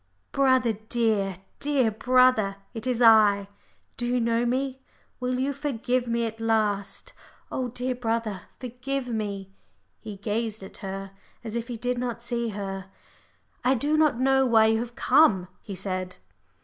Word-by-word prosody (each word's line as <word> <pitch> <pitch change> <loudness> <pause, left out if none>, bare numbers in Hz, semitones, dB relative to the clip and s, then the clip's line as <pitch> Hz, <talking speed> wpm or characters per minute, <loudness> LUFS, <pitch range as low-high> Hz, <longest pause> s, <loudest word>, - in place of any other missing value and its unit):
"Brother, 260 -4 +3 0.2
dear, 215 -5 +1 0.2
dear 275 -6 +2
brother, 250 -3 +3 0.2
it 230 +1 -5
is 245 -1 +1
I. 210 -3 +6 0.5
Do 240 - -2
you 250 +1 +1
know 230 +1 +1
me 265 +1 -1 0.4
will 250 0 -1
you 275 +2 0
forgive 255 -3 -1
me 235 0 0
at 225 0 -5
last? 215 -3 0 0.4
Oh, 255 -1 -1
dear, 250 +2 -2
dear 245 - -14
brother, 225 -4 -1 0.2
forgive 255 +2 -4
me." 200 -4 -3 0.5
He 215 -2 -8
gazed 215 +1 -3
at 190 - -9
her 195 -1 -6 0.3
as 225 -1 -5
if 235 0 -3
he 240 -2 -5
did 245 +1 -1
not 240 -1 -3
see 235 -1 -1
her. 195 -2 -5 0.7
"I 260 +2 +4
do 290 +5 +1
not 305 -6 +3
know 265 +1 +4
why 225 -4 +5
you 220 0 +3
have 240 +1 -5
come," 255 - +4
he 200 - -7
said. 185 -1 -4
235 Hz, 160 wpm, -26 LUFS, 210-255 Hz, 0.7 s, I